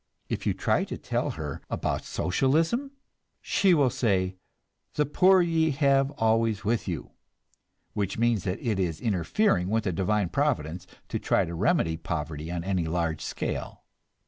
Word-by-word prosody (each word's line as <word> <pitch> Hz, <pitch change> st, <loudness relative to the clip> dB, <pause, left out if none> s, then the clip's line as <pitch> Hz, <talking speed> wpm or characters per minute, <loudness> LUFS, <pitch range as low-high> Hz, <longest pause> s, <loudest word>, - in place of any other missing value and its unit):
If -, -, -3 dB
you -, -, +1 dB
try -, -, +1 dB
to -, -, -6 dB
tell -, -, -2 dB
her 75 Hz, -3 st, -5 dB
about -, -, -2 dB
Socialism, 160 Hz, -, +1 dB, 0.5 s
she 190 Hz, -3 st, +3 dB
will 140 Hz, -5 st, +3 dB
say, 95 Hz, -6 st, 0 dB, 0.6 s
"The 150 Hz, -, +2 dB
poor 185 Hz, +5 st, +5 dB
ye 165 Hz, -2 st, +2 dB
have 140 Hz, -1 st, +3 dB
always 110 Hz, -1 st, +1 dB
with 115 Hz, +1 st, 0 dB
you"; 85 Hz, -5 st, -4 dB, 0.8 s
which 100 Hz, -2 st, -2 dB
means 115 Hz, -4 st, +2 dB
that 90 Hz, 0 st, -1 dB
it 110 Hz, -5 st, 0 dB
is 85 Hz, -3 st, -1 dB
interfering 95 Hz, -, +1 dB
with 110 Hz, +1 st, +1 dB
Divine 95 Hz, +2 st, 0 dB
Providence 85 Hz, +5 st, -1 dB, 0.2 s
to -, -, -2 dB
try -, -, +2 dB
to 85 Hz, -, -6 dB
remedy 85 Hz, -, +1 dB
poverty 80 Hz, -1 st, -4 dB
on 85 Hz, -1 st, -3 dB
any 90 Hz, -3 st, -1 dB
large 85 Hz, -1 st, -1 dB
scale. -, -, -4 dB
100 Hz, 150 wpm, -27 LUFS, 85-135 Hz, 0.8 s, poor